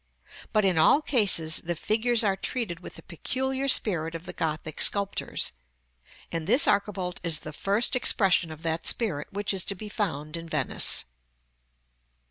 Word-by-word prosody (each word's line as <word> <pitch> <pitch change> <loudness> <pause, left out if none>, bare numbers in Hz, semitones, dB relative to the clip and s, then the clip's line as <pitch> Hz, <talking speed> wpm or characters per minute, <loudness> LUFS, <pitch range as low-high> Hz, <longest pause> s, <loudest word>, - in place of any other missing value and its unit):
But, 215 -2 +2
in 180 -4 +2
all 275 - +5
cases, 190 - +3
the 175 +1 -4
figures 230 +6 +2
are 195 -2 +2
treated 195 -3 -3
with 180 - -10
the - - -11
peculiar 265 - -3
spirit 170 -10 +2
of 165 +1 -8
the - - -7
Gothic 155 -1 -3
sculptors; 200 -1 0 0.8
and 165 -1 -4
this 255 - +5
archivolt 195 -3 0
is 170 -3 0
the 155 - -8
first 205 - 0
expression 190 -8 +3
of 155 +1 -11
that 165 0 -2
spirit 170 -11 0
which 205 +1 -1
is 190 -2 0
to 200 - -3
be 210 +3 -8
found 155 -7 -3
in 165 0 -9
Venice. 150 - +1
190 Hz, 160 wpm, -26 LUFS, 165-215 Hz, 0.8 s, all